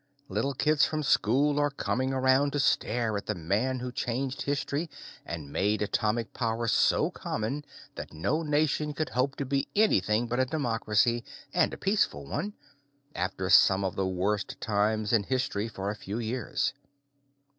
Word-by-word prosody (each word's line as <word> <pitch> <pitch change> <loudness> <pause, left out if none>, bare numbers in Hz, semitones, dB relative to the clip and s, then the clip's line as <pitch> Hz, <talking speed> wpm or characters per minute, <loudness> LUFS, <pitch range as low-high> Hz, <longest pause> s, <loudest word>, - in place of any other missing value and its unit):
Little 140 0 -1
kids 150 +2 +3
from 155 -1 +1
school 140 +4 +3
are 145 0 +3
coming 130 -2 -1
around 130 +2 +3
to 145 - 0
stare 115 -4 +1
at 100 - -7
the 105 - -1
man 105 +10 -1
who 125 0 -4
changed 130 +2 -2
history 140 +3 -2 0.4
and 75 -4 -6
made 105 +2 +1
atomic 110 +2 -1
power 115 -1 -1
so - - +3
common 135 +8 -3 0.3
that - - -7
no 85 - -1
nation 150 -1 0
could 155 +2 -2
hope 130 +3 0
to 140 - -3
be 135 +1 0
anything 110 - +3
but 120 +2 -2
a 130 - +4
democracy 120 -4 +1 0.3
and - - +3
a - - -6
peaceful 190 - 0
one 170 - -3 0.6
after 95 +1 -2
some 95 0 +6
of 95 - -2
the 95 -1 0
worst 100 +3 -1
times 105 +1 0
in 115 - +5
history 115 -2 -1
for 100 -2 -4
a - - -5
few 105 +1 -5
years. 120 +1 -1
120 Hz, 165 wpm, -28 LUFS, 105-140 Hz, 0.6 s, some